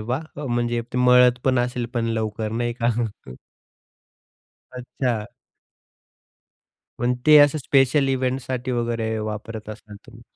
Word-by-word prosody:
वाह! 125 +7 -3 0.2
अ, - - -5
म्हणजे 120 -1 -1
ते 125 - -1
मळतपण 125 0 +4
असेल 120 0 -1
पण 120 -1 0
लवकर 110 -1 -2
नाही 120 +1 -1
का? 120 - +3 1.8
अच्छा. 125 -3 -3 1.7
पण 125 +1 0
ते 155 0 +8
असं 145 +1 +5
स्पेशल 135 0 +2
इव्हेंटसाठी 130 -1 -2
वगैरे 115 -2 -2
वापरत 110 0 -6
असाल 105 -1 -10
तुम्ही. 120 -1 -15
120 Hz, 115 wpm, -22 LUFS, 115-130 Hz, 1.8 s, ते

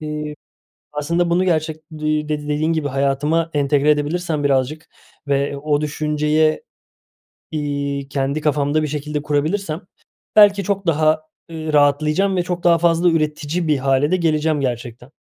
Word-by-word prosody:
Eee, 150 -1 -5 0.6
aslında 170 +4 0
bunu 175 +2 +2
gerçek 160 -3 0
d 155 -1 -5
eee, 155 0 0
dedi 150 -1 -2
dediğin 155 +2 +1
gibi 155 -3 -1
hayatıma 140 +4 0
entegre 145 +1 +2
edebilirsem 150 +1 -1
birazcık 140 +3 0 0.4
ve 140 0 0
o 145 +1 0
düşünceye, 150 - 0 0.9
iii, 140 -2 -3
kendi 140 +1 -1
kafamda 150 +1 +1
bir - - -1
şekilde 150 0 -3
kurabilirsem 155 +4 -1 0.5
belki 205 -1 +6
çok 195 -1 -2
daha, 155 0 +2 0.3
ııı, 155 -1 -5
rahatlayacağım 150 +7 +3
ve 180 - +1
çok 175 -1 -4
daha 170 -1 +5
fazla 170 +1 +3
üretici 155 +1 -1
bir 150 -2 +2
hâle 135 +3 +1
de - - +4
geleceğim 155 -3 +1
gerçekten. 120 0 -4
150 Hz, 145 wpm, -20 LUFS, 145-160 Hz, 0.9 s, belki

